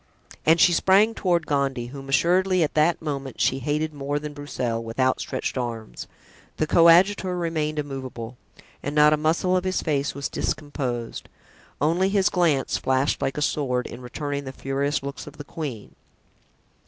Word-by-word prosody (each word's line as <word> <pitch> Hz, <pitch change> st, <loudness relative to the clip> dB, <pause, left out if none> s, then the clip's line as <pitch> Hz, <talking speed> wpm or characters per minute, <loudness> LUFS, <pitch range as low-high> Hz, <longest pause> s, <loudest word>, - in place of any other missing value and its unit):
And 165 Hz, +2 st, +6 dB
she 175 Hz, -, +6 dB
sprang 195 Hz, +6 st, +4 dB
toward 175 Hz, -6 st, 0 dB
Gondy, 135 Hz, -4 st, -1 dB
whom 135 Hz, -1 st, -9 dB
assuredly 180 Hz, +5 st, +3 dB
at 150 Hz, -, -1 dB
that 155 Hz, +2 st, +2 dB
moment 140 Hz, -4 st, -4 dB
she 135 Hz, -, +2 dB
hated 150 Hz, +3 st, -1 dB
more 145 Hz, 0 st, -2 dB
than 150 Hz, 0 st, -5 dB
Broussel, 125 Hz, -5 st, -3 dB
with 115 Hz, +2 st, -8 dB
outstretched 130 Hz, 0 st, 0 dB
arms. 115 Hz, -, -5 dB, 0.5 s
The 155 Hz, -, +1 dB
coadjutor 180 Hz, +3 st, +5 dB
remained 155 Hz, -3 st, -2 dB
immovable 130 Hz, -5 st, -5 dB, 0.5 s
and 145 Hz, +1 st, -4 dB
not 150 Hz, 0 st, +6 dB
a -, -, +5 dB
muscle 165 Hz, +4 st, +1 dB
of 180 Hz, -, +1 dB
his 185 Hz, 0 st, -1 dB
face 140 Hz, -3 st, -1 dB
was 140 Hz, 0 st, -3 dB
discomposed; 130 Hz, -6 st, -4 dB, 0.5 s
only 170 Hz, +6 st, +2 dB
his 195 Hz, -1 st, +3 dB
glance 165 Hz, -7 st, +1 dB
flashed 130 Hz, +2 st, 0 dB
like 135 Hz, -, -1 dB
a 150 Hz, -, 0 dB
sword 125 Hz, -4 st, 0 dB
in 125 Hz, -, -8 dB
returning 140 Hz, +3 st, -4 dB
the 130 Hz, -, -5 dB
furious 135 Hz, +2 st, -2 dB
looks 140 Hz, 0 st, -6 dB
of -, -, -11 dB
the 145 Hz, -, -7 dB
queen. 140 Hz, -8 st, -7 dB
145 Hz, 165 wpm, -24 LUFS, 135-165 Hz, 0.5 s, And